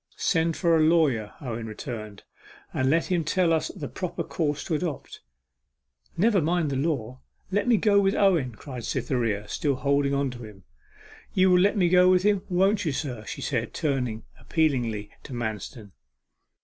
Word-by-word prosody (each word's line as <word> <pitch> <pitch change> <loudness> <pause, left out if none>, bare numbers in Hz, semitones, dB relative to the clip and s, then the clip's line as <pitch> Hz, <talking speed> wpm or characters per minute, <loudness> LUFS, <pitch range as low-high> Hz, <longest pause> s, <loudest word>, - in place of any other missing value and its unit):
'Send 165 -2 +1
for 170 -3 +3
a - - +3
lawyer,' 155 -10 +2
Owen 115 -4 -5
returned, 110 -2 -7 0.5
'and 130 0 +1
let 165 +3 +2
him 175 -2 +2
tell 170 +2 +2
us 160 - +1
the 155 -8 -7
proper 180 -2 -4
course 150 -3 -2
to 170 - -3
adopt.' 155 -2 -4 1.0
'Never 205 +1 +3
mind 165 -1 0
the - - -1
law 130 -4 -2 0.3
let 205 +4 0
me 240 -3 +5
go 205 -1 +4
with 195 0 +2
Owen!' 165 - +2
cried 125 +1 -8
Cytherea, 110 -6 -1
still 140 +5 -1
holding 140 +1 +1
on 140 -1 0
to 120 -1 -9
him. 105 -3 -12 0.7
'You 185 0 +4
will 180 - +6
let 200 +3 +3
me 180 -3 +3
go 180 +1 +5
with 185 0 +4
him, 205 -2 +3
won't 190 +3 +2
you, 160 - 0
sir?' 125 -6 -4
she 110 - -6
said, 120 -4 -2
turning 125 -8 -1 0.2
appealingly 120 -10 -1
to 135 - -10
Manston. 110 -2 -5
145 Hz, 175 wpm, -26 LUFS, 120-180 Hz, 1.0 s, will